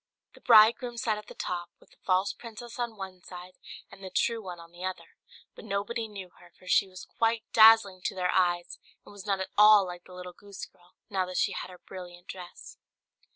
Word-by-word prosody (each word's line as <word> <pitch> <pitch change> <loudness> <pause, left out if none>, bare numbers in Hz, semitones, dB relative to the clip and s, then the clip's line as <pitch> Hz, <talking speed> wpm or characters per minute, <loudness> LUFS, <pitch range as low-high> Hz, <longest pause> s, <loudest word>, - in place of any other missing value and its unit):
The - - -18
bridegroom 235 +1 +5
sat 220 -2 -1
at 210 - -14
the - - -11
top, 175 -1 -4
with - - -24
the - - -23
false 185 +2 +1
princess 235 +1 -10
on 235 -2 -3
one 190 -2 -8
side, 180 +1 -11 0.4
and 195 - -14
the 190 - -6
true 230 +4 0
one 180 -4 -8
on 170 0 -14
the 175 +1 -11
other; 185 - -6 0.4
but - - -12
nobody 220 +3 -3
knew 195 -4 -9
her, 175 - -17
for - - -20
she 195 +2 +3
was 185 -1 -11
quite 225 -1 0
dazzling 220 -4 +7
to - - -1
their 180 -1 0
eyes, 175 -2 0 0.3
and - - -14
was 205 0 -11
not 195 -1 +1
at 190 - -4
all 210 -1 +8
like 175 -1 -8
the 180 - -13
little 180 0 -8
goose 200 +2 -9
girl, 175 0 -26 0.2
now 190 -2 0
that 185 - -5
she - - +2
had - - -5
her 180 - -12
brilliant 175 -1 -11
dress. 180 -2 -10
190 Hz, 220 wpm, -28 LUFS, 180-215 Hz, 0.4 s, all